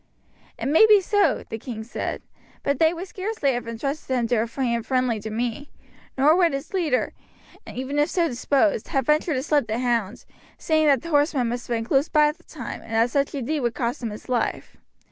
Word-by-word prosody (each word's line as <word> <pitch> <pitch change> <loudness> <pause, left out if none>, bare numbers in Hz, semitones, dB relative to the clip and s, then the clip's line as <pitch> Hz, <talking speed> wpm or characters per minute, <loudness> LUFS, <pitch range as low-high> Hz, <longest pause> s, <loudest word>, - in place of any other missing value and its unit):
"It - - -5
may 320 +10 +6
be 425 -1 +7
so," 405 +2 +1
the 225 - -6
king 225 -1 -6
replied; 230 - -4 0.4
"but 280 -1 0
they 320 0 +5
would 350 +3 -6
scarcely 375 -7 -1
have 240 -1 -4
intrusted 260 +3 -3
him 235 -1 0
to 245 - +2
a 225 +2 +1
hand 235 -1 -1
friendly 255 -3 0
to 215 +1 -6
me. 240 +5 -3 0.5
Nor 290 +4 +5
would 345 -4 +3
his 275 +6 -5
leader, 320 -9 0 0.6
even 265 +3 -3
if 295 +3 +2
so 340 -1 +1
disposed, 270 0 +1
have 270 -2 0
ventured 305 +2 +2
to 260 - -1
slip 295 -5 +1
the 220 +1 -1
hound, 235 -4 -1 0.3
seeing 315 -1 +2
that 275 -4 +3
the 335 - -6
horsemen 290 -5 +2
must 240 +1 -4
have 240 - -1
been 225 0 -2
close 275 +5 +2
by 300 -2 +4
at 300 +3 -7
the - - -23
time, 255 -8 -7
and 225 - -10
that 230 +2 +3
such 280 +2 0
a 270 - -3
deed 305 +5 -1
would 240 -3 -1
cost 240 0 -2
him 235 - -2
his 210 - -9
life. 245 -3 -2
270 Hz, 220 wpm, -24 LUFS, 235-305 Hz, 0.6 s, be